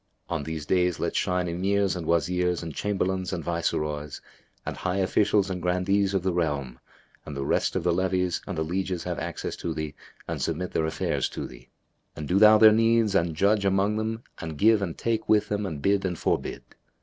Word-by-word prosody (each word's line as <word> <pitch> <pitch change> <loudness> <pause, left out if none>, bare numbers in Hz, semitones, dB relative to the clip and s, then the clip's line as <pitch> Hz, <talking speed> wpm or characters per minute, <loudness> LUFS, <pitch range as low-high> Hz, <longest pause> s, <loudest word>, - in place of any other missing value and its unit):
On - - -1
these 80 0 -5
days 90 +1 +1
let - - -2
shine 90 0 0
Emirs 95 +3 0
and 85 -3 -5
Wazirs 90 +1 +1
and 80 -2 -6
Chamberlains 95 0 -1
and 90 -4 -3
Viceroys 75 -3 -2 0.5
and - - -4
high 90 +1 -2
Officials 100 +1 +2
and 90 -1 -4
Grandees 95 +3 +1
of 95 - 0
the 95 -1 0
realm 75 -7 -2 0.4
and 75 - -7
the 70 - -2
rest - - +1
of - - 0
the 90 - +2
levies 90 -1 0
and 95 -4 -4
the 80 - 0
lieges 90 +1 -2
have - - -3
access - - -4
to 85 -2 -4
thee 80 -2 -4 0.3
and - - -4
submit 85 +3 -2
their 80 - 0
affairs 80 - -1
to - - -5
thee; 60 -2 -13 0.5
and 75 - -6
do 95 +5 +2
thou 110 0 +8
their 110 0 +8
needs 115 -1 +3
and 85 -4 +1
judge 100 +4 +2
among 100 +2 +2
them 110 +1 -3 0.2
and 80 -2 -6
give 110 +4 +4
and 85 -5 -3
take 115 -1 -1
with 105 -1 +3
them 105 -1 -1
and 75 -6 -6
bid 100 0 +2
and 90 -3 -2
forbid. - - -2
90 Hz, 205 wpm, -26 LUFS, 80-100 Hz, 0.5 s, thou